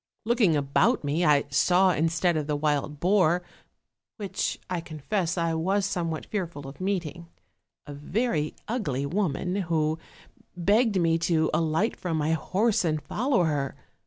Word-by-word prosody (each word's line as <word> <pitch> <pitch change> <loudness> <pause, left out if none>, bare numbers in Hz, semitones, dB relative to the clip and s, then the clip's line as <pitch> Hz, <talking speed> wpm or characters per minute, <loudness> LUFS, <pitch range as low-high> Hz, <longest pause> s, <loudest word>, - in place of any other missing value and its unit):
Looking 225 -8 +3
about 145 - +2
me, 150 +4 0
I 150 -3 +4
saw, 180 +6 +4
instead 165 +2 +1
of 150 -2 -2
the 150 - 0
wild 145 0 -1
boar, 180 -1 +3 0.7
which 200 -2 -2
I 180 -2 -2
confess 165 +3 -2
I 165 -1 0
was 190 +5 +1
somewhat 165 -5 -2
fearful 170 -9 -4
of 135 +6 -11
meeting, 175 -3 -3 0.6
a 145 - -8
very 155 - -1
ugly 150 - -2
woman, 180 +2 -1
who 160 -4 0 0.6
begged 205 +3 +3
me 165 -1 +2
to 160 -1 +1
alight 160 +7 +1
from 170 -3 -3
my 155 +1 0
horse 195 +7 +1
and 155 -3 0
follow 230 - 0
her. 145 -4 -1
170 Hz, 145 wpm, -26 LUFS, 155-190 Hz, 0.7 s, I